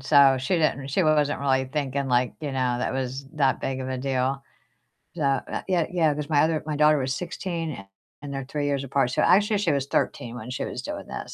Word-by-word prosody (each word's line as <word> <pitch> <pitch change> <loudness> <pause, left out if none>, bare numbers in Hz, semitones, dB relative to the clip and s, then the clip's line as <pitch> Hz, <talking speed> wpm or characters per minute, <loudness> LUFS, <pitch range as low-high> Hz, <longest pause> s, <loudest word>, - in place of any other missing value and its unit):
so 135 -1 +6
she 175 +7 0
didn't 140 -4 0
she 170 +7 +1
wasn't 150 -1 +2
really 130 -1 +2
thinking, 140 0 -2
like, 125 -1 +2
you 150 - -3
know, 130 -2 0
that - - -1
was 130 +1 -3
that 135 -3 +2
big 130 0 -3
of 130 - -4
a 130 - -2
deal, 135 +1 -1 0.7
so - - -3
uh, 135 -1 -1
yeah 175 -4 +1
yeah, 165 -4 +2
'cause 150 +1 -5
my 145 -2 +4
other 160 -1 +1
my 155 - -1
daughter 150 0 +4
was 130 0 -1
16 170 -2 -4
and 95 -7 -9 0.4
and 140 - -6
they're 135 -1 -4
3 145 +2 -2
years 140 -1 0
apart, 135 -1 +1
so - - +1
actually 210 +2 +4
she 195 -6 +1
was 140 -1 0
13 120 -4 -1
when 125 +1 -7
she 130 - -3
was - - -5
doing - - -6
this, - - -7
140 Hz, 235 wpm, -25 LUFS, 130-155 Hz, 0.7 s, so